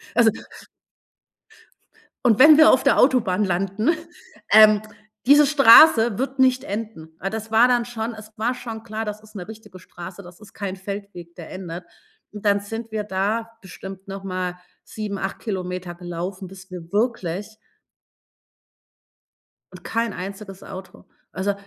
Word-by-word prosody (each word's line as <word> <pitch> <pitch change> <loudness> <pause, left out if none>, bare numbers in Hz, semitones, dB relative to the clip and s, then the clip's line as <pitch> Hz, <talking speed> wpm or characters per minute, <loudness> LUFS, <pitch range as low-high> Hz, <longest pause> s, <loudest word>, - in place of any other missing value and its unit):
Also 235 -2 +5 2.0
und 230 -2 +4
wenn 300 +2 +9
wir 315 - +8
auf 260 - +3
der - - +3
Autobahn 215 -7 +3
landen, 195 - 0 0.6
ähm, 215 0 +7 0.5
diese 290 +2 +7
Straße 240 -5 +7
wird 265 +1 -3
nicht 260 -1 +3
enden.“ 200 -7 -7
Weil 195 - -3
das 220 +1 -6
war 230 +3 +5
dann 240 -2 +1
schon 230 -1 -5
es 215 0 -12
war 235 +4 -1
schon 225 -3 -7
klar, 220 0 -5
das 210 0 -6
ist 215 0 -19
'ne 180 -3 -7
richtige 215 -3 -12
Straße, 180 +2 -11
das 175 -1 -15
ist 210 - -16
kein 195 -2 -5
Feldweg, 195 -3 -8
der 170 - -10
endet. 180 -2 -7 0.5
Und 210 -1 -10
dann 200 -1 +2
sind 225 +2 -7
wir 215 -1 -2
da 210 +3 -2
bestimmt 190 0 -10
noch 195 0 -7
mal 185 -2 -4 0.3
7, 210 -2 -6
8 195 0 -4
Kilometer 180 -3 -5
gelaufen, 175 +2 -6
bis 190 0 -14
wir 170 -2 -9
wirklich 210 -2 -2 2.2
Und - - -13
kein 230 -2 -2
einziges 195 +1 -8
Auto. 190 0 -11 0.3
Also, 195 +2 -1
205 Hz, 150 wpm, -22 LUFS, 185-225 Hz, 2.2 s, wenn